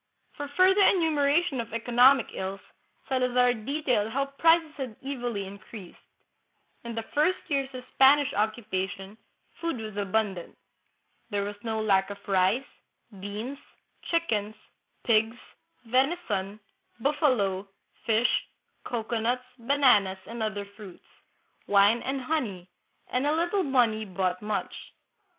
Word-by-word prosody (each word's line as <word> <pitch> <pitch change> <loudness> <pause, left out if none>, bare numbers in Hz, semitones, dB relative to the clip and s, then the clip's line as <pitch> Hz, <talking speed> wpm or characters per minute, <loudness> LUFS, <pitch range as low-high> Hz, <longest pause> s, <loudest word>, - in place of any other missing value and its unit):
For 290 -1 -5
further 380 +2 +5
enumera 320 -4 +3
tion 265 -7 -2
of 225 - -10
economic 245 +3 +4
ills, 190 +1 -4 0.5
Salazar 250 -1 +2
details 245 -2 -1
how 275 +3 0
prices 325 -1 +4
had 260 -6 -6
evilly 245 -7 -3
increased. 195 0 -11 0.8
In 235 -1 -6
the 225 - -3
first 315 +5 +2
years 275 -3 0
of 250 - -7
Spanish 275 +1 +5
occupation, 200 -2 -2 0.4
food 335 -5 -2
was 215 -2 -7
abundant. 200 -3 -2 0.7
There 205 -2 -1
was 205 +1 -5
no 220 -1 -2
lack 195 -3 +2
of 200 - -6
rice, 195 +6 +2 0.5
beans, 215 +8 -6 0.5
chickens, 220 -11 -1 0.5
pigs, 225 0 +2 0.5
venison, 230 - 0 0.4
buffalo, 230 - +1 0.4
fish, 225 +2 +2 0.4
cocoanuts, 235 +1 -2
bananas, 235 -7 +3
and 235 0 -7
other 205 -2 -2
fruits, 200 -2 -13 0.6
wine 205 +3 +4
and 270 0 -3
honey; 245 - -3 0.4
and 255 +3 0
a 300 - +2
little 345 +4 +1
money 240 -8 +2
bought 185 -2 -2
much. 210 0 -3
230 Hz, 120 wpm, -27 LUFS, 205-275 Hz, 0.8 s, further